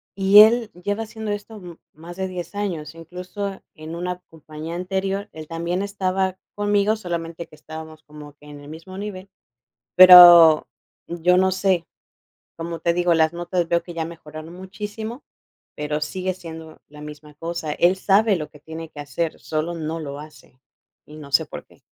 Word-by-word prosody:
y 195 Hz, +1 st, +7 dB
él 225 Hz, +1 st, +4 dB
lleva 205 Hz, +5 st, -3 dB
haciendo 220 Hz, -1 st, -6 dB
esto 205 Hz, +2 st, -6 dB
m 175 Hz, -4 st, -11 dB, 0.2 s
más 170 Hz, +3 st, -11 dB
de 190 Hz, 0 st, -2 dB
10 180 Hz, 0 st, -7 dB
años, 170 Hz, -7 st, -4 dB
incluso 180 Hz, +4 st, -7 dB
en 160 Hz, -1 st, -9 dB
una 180 Hz, +1 st, -4 dB
compañía 160 Hz, +1 st, -9 dB
anterior, 195 Hz, +3 st, -3 dB
él 155 Hz, -1 st, -9 dB
también 170 Hz, +3 st, -3 dB
estaba 190 Hz, -2 st, -2 dB, 0.2 s
conmigo, 205 Hz, +1 st, +1 dB
solamente 170 Hz, -4 st, -5 dB
que 155 Hz, -, -17 dB
estábamos 155 Hz, 0 st, -11 dB
como 150 Hz, -1 st, -13 dB
que 150 Hz, -, -20 dB
en 145 Hz, -, -11 dB
el 145 Hz, -, -13 dB
mismo 175 Hz, +5 st, -10 dB
nivel, 200 Hz, -2 st, -7 dB, 0.7 s
pero 175 Hz, -3 st, +10 dB, 0.4 s
yo 175 Hz, +1 st, +1 dB
no 190 Hz, 0 st, +3 dB
sé, 185 Hz, -3 st, 0 dB, 0.7 s
como 165 Hz, 0 st, -6 dB
te 170 Hz, 0 st, +1 dB
digo, 175 Hz, 0 st, +2 dB
las 160 Hz, 0 st, +2 dB
notas 175 Hz, 0 st, -2 dB
veo 170 Hz, 0 st, +1 dB
que 175 Hz, -, -10 dB
ya 165 Hz, -1 st, -3 dB
mejoraron 160 Hz, 0 st, -10 dB
muchísimo, 210 Hz, +6 st, -7 dB, 0.5 s
pero 150 Hz, 0 st, -3 dB
sigue 185 Hz, +4 st, -3 dB
siendo 160 Hz, -3 st, -11 dB
la 150 Hz, 0 st, -14 dB
misma 150 Hz, 0 st, -11 dB
cosa. 165 Hz, -1 st, -5 dB
Él 180 Hz, +4 st, +2 dB
sabe 200 Hz, +1 st, +3 dB
lo 150 Hz, -2 st, -6 dB
que 150 Hz, -, -17 dB
tiene 160 Hz, 0 st, -8 dB
que 145 Hz, -, -9 dB
hacer, 160 Hz, +3 st, -3 dB
solo 160 Hz, +2 st, -3 dB
no 165 Hz, 0 st, -4 dB
lo 140 Hz, -2 st, -6 dB
hace, 150 Hz, -4 st, -15 dB, 0.4 s
y 155 Hz, +1 st, -13 dB
no 140 Hz, -2 st, -11 dB
sé -, -, +4 dB
por -, -, -9 dB
qué. -, -, -24 dB
170 Hz, 175 wpm, -22 LUFS, 155-190 Hz, 0.7 s, pero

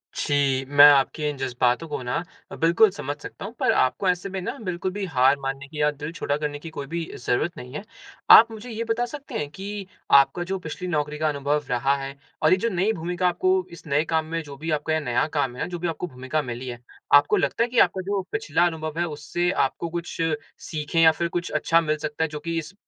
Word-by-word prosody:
जी, 140 Hz, -2 st, +1 dB
मैं 145 Hz, 0 st, +8 dB
आपके 145 Hz, +2 st, +1 dB
इन 145 Hz, -, -5 dB
जज़्बातों 125 Hz, +3 st, 0 dB
को 145 Hz, -, -4 dB
ना 125 Hz, -, -2 dB, 0.4 s
अ, -, -, -6 dB
बिल्कुल 170 Hz, +6 st, +4 dB
समझ 145 Hz, -7 st, -5 dB
सकता -, -, -8 dB
हूँ, 220 Hz, -, -7 dB
पर -, -, +3 dB
आपको 130 Hz, +9 st, +1 dB
ऐसे 180 Hz, +2 st, -1 dB
में 190 Hz, 0 st, -4 dB
ना, -, -, -4 dB
बिल्कुल 180 Hz, -1 st, -3 dB
भी 200 Hz, 0 st, -4 dB
हार 135 Hz, -3 st, +3 dB
मानने 135 Hz, +1 st, -4 dB
की 150 Hz, +1 st, -5 dB
या 150 Hz, -, +4 dB
दिल 150 Hz, +2 st, -7 dB
छोटा 145 Hz, -4 st, -1 dB
करने 145 Hz, -1 st, -3 dB
की 165 Hz, -, -8 dB
कोई 145 Hz, -3 st, -7 dB
भी 170 Hz, +2 st, -3 dB
ज़रूरत 155 Hz, +8 st, -1 dB
नहीं 125 Hz, -2 st, -9 dB
है। 150 Hz, -, -5 dB, 0.5 s
आप 230 Hz, +1 st, +10 dB
मुझे 220 Hz, +2 st, -9 dB
ये 230 Hz, 0 st, -3 dB
बता 240 Hz, +2 st, +1 dB
सकते 280 Hz, +3 st, -9 dB
हैं 145 Hz, -1 st, -3 dB
कि, 195 Hz, +3 st, -6 dB, 0.2 s
आपका 140 Hz, +5 st, +5 dB
जो 190 Hz, +1 st, -3 dB
पिछली 180 Hz, +2 st, -6 dB
नौकरी 150 Hz, -2 st, -1 dB
का 155 Hz, 0 st, +1 dB
अनुभव 145 Hz, +1 st, -1 dB
रहा 125 Hz, +3 st, +2 dB
है 135 Hz, +1 st, -6 dB, 0.3 s
और 155 Hz, -, +4 dB
ये 185 Hz, -, +6 dB
जो 230 Hz, +5 st, 0 dB
नई 190 Hz, +2 st, +1 dB
भूमिका 180 Hz, +1 st, -1 dB
आपको 185 Hz, +1 st, +1 dB
इस 170 Hz, -, -12 dB
नए 145 Hz, +2 st, +2 dB
काम 160 Hz, -1 st, +1 dB
में 165 Hz, +1 st, -3 dB
जो 140 Hz, -1 st, -10 dB
भी 160 Hz, +3 st, -4 dB
आपका 155 Hz, +1 st, 0 dB
ये 160 Hz, -, +2 dB
नया 125 Hz, -5 st, 0 dB
काम 135 Hz, -4 st, 0 dB
है, -, -, -3 dB
जो 175 Hz, -1 st, -5 dB
भी 175 Hz, -, -2 dB
आपको 165 Hz, +2 st, -3 dB
भूमिका 130 Hz, +2 st, -3 dB
मिली 125 Hz, -1 st, -6 dB
है, 120 Hz, -1 st, -6 dB, 0.3 s
आपको 145 Hz, 0 st, +6 dB
लगता 145 Hz, +11 st, +1 dB
है 240 Hz, -, -1 dB
कि 240 Hz, -1 st, +1 dB
आपका 190 Hz, -, +3 dB
जो 200 Hz, -1 st, 0 dB
पिछला 415 Hz, -, +1 dB
अनुभव 160 Hz, -1 st, -4 dB
है, 175 Hz, -, +2 dB
उससे 165 Hz, +3 st, -2 dB
आपको 165 Hz, +1 st, -1 dB
कुछ 170 Hz, +1 st, -5 dB, 0.5 s
सीखें 155 Hz, +2 st, -1 dB
या 160 Hz, -1 st, +8 dB
फिर 170 Hz, +2 st, -2 dB
कुछ 175 Hz, -, -4 dB
अच्छा 165 Hz, +1 st, +3 dB
मिल 155 Hz, -1 st, 0 dB
सकता 150 Hz, +1 st, -3 dB
है, 160 Hz, -, +1 dB
जो 150 Hz, 0 st, -6 dB
कि 165 Hz, +2 st, -3 dB
इस 165 Hz, +4 st, -8 dB
155 Hz, 245 wpm, -24 LUFS, 145-180 Hz, 0.5 s, आप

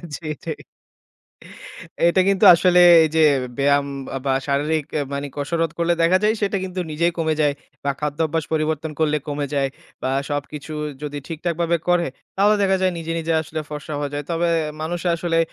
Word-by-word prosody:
জি, 165 Hz, -, -10 dB
এটাই। -, -, -6 dB, 1.5 s
এটা 185 Hz, +2 st, +3 dB
কিন্তু 195 Hz, -1 st, +3 dB
আসলে 180 Hz, +1 st, +3 dB, 0.3 s
এই -, -, +1 dB
যে -, -, +4 dB, 0.4 s
ব্যায়াম 140 Hz, 0 st, +3 dB, 0.4 s
বা 135 Hz, -, +2 dB, 0.2 s
শারীরিক 150 Hz, +2 st, 0 dB, 0.2 s
আ -, -, 0 dB
মানে 140 Hz, +1 st, -3 dB
কসরত 165 Hz, +3 st, -1 dB
করলে 170 Hz, 0 st, +2 dB
দেখা 180 Hz, +3 st, +4 dB
যায়, 215 Hz, +1 st, +3 dB
সেটা 200 Hz, 0 st, +1 dB
কিন্তু 185 Hz, 0 st, -4 dB
নিজেই 170 Hz, +3 st, +1 dB
কমে 160 Hz, -1 st, +1 dB
যায়। 145 Hz, -1 st, +2 dB, 0.3 s
বা 140 Hz, -, +1 dB
খাদ্যাভ্যাস 155 Hz, +2 st, -1 dB
পরিবর্তন 155 Hz, 0 st, -1 dB
করলে 150 Hz, -1 st, +2 dB
কমে 145 Hz, 0 st, -2 dB
যায়। 135 Hz, -1 st, +1 dB, 0.3 s
বা 130 Hz, -, -1 dB, 0.2 s
সবকিছু 145 Hz, +1 st, -5 dB, 0.3 s
যদি 145 Hz, 0 st, -4 dB
ঠিকঠাকভাবে 170 Hz, +1 st, -1 dB
করে, 175 Hz, -1 st, +3 dB, 0.3 s
তাহলে 205 Hz, +2 st, +4 dB
দেখা 190 Hz, -1 st, +3 dB
যায় 185 Hz, -1 st, +2 dB
নিজে, 165 Hz, 0 st, -4 dB
নিজে 165 Hz, +1 st, -1 dB
আসলে 155 Hz, 0 st, -5 dB
ফর্সা 150 Hz, 0 st, -6 dB
হয়ে 145 Hz, 0 st, -3 dB
যায়। 145 Hz, 0 st, -3 dB
তবে 170 Hz, +1 st, +1 dB, 0.3 s
মানুষের 175 Hz, +2 st, -2 dB
আসলে, 165 Hz, -1 st, 0 dB
160 Hz, 170 wpm, -21 LUFS, 145-170 Hz, 1.5 s, যে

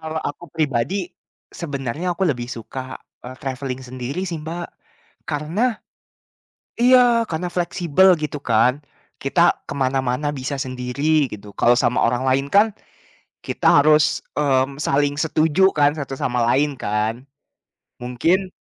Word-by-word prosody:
Kalau 160 Hz, 0 st, -6 dB
aku 145 Hz, +4 st, -9 dB
pribadi 145 Hz, 0 st, -1 dB, 0.6 s
sebenarnya 150 Hz, +3 st, -4 dB
aku 190 Hz, -, 0 dB
lebih 120 Hz, -7 st, -1 dB
suka, 130 Hz, +2 st, -7 dB, 0.3 s
eee, 130 Hz, +1 st, -8 dB
traveling 130 Hz, -1 st, -5 dB
sendiri 130 Hz, +8 st, -5 dB
sih, 170 Hz, -4 st, -4 dB
Mbak. 170 Hz, +3 st, -5 dB, 0.6 s
Karena 185 Hz, -, -1 dB, 1.0 s
iya, 245 Hz, -1 st, +5 dB
karena 175 Hz, -3 st, -4 dB
fleksibel 175 Hz, 0 st, +2 dB
gitu 150 Hz, -1 st, -5 dB
kan. 125 Hz, +5 st, +2 dB, 0.3 s
Kita 170 Hz, +5 st, +1 dB
ke -, -, -11 dB
mana-mana 130 Hz, +1 st, 0 dB
bisa 140 Hz, +2 st, -4 dB
sendiri 135 Hz, +4 st, 0 dB
gitu, 105 Hz, -1 st, -9 dB
kalau 120 Hz, +1 st, +4 dB
sama 125 Hz, -, +1 dB
orang 125 Hz, +2 st, -1 dB
lain 135 Hz, +1 st, +2 dB
kan, 210 Hz, +2 st, +5 dB, 0.7 s
kita -, -, -5 dB, 0.2 s
harus, 150 Hz, 0 st, +3 dB, 0.2 s
mmm, 135 Hz, -1 st, +1 dB
saling 145 Hz, 0 st, +1 dB
setuju 160 Hz, +4 st, +3 dB
kan 145 Hz, -1 st, +3 dB
satu 140 Hz, -2 st, -5 dB
sama 125 Hz, -1 st, -1 dB
lain 145 Hz, +2 st, +1 dB
kan? 110 Hz, +4 st, -2 dB, 0.8 s
Mungkin 165 Hz, +11 st, 0 dB
145 Hz, 130 wpm, -21 LUFS, 130-170 Hz, 1.0 s, iya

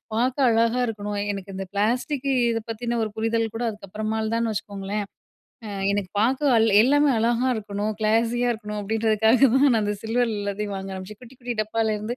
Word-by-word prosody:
பாக்க 250 Hz, +3 st, +1 dB
அழகாக 230 Hz, +1 st, +2 dB
இருக்கணும், 205 Hz, -2 st, -4 dB, 0.2 s
எனக்கு 195 Hz, 0 st, -7 dB
இந்த 195 Hz, -, -4 dB
பிளாஸ்டிக் 245 Hz, +7 st, 0 dB, 0.2 s
இதப் 225 Hz, -1 st, -3 dB
பத்தின 235 Hz, +1 st, -2 dB
ஒரு 215 Hz, -, -2 dB
புரிதல்கூட 225 Hz, +1 st, -1 dB
அதுக்கப்புறமால்தான்னு 220 Hz, +2 st, -2 dB
வச்சுக்கோங்களேன். 200 Hz, 0 st, -4 dB, 0.6 s
அ -, -, -6 dB, 0.2 s
எனக்கு 200 Hz, -2 st, -2 dB
பாக்க 260 Hz, +7 st, +2 dB
அ -, -, +5 dB, 0.2 s
எல்லாமே 290 Hz, +4 st, +4 dB
அழகா 235 Hz, +3 st, +1 dB
இருக்கணும், 205 Hz, 0 st, -3 dB
கிளாஸியா 230 Hz, +3 st, +1 dB
இருக்கணும், 210 Hz, -2 st, -5 dB
அப்பிடின்றதுக்காகதான் 225 Hz, +5 st, +3 dB
நான் 230 Hz, -5 st, +3 dB
அந்த 205 Hz, 0 st, -1 dB
சில்வர்ல 225 Hz, -1 st, 0 dB
எல்லாத்தையும் 205 Hz, 0 st, -3 dB
வாங்க 195 Hz, 0 st, -6 dB
ஆரம்பிச்சேன். 190 Hz, +2 st, -8 dB
குட்டி, 250 Hz, +1 st, -14 dB
குட்டி 245 Hz, -1 st, -4 dB
டப்பால்ல 220 Hz, 0 st, 0 dB
இருந்து, 215 Hz, +3 st, -4 dB
220 Hz, 160 wpm, -24 LUFS, 210-235 Hz, 0.6 s, அ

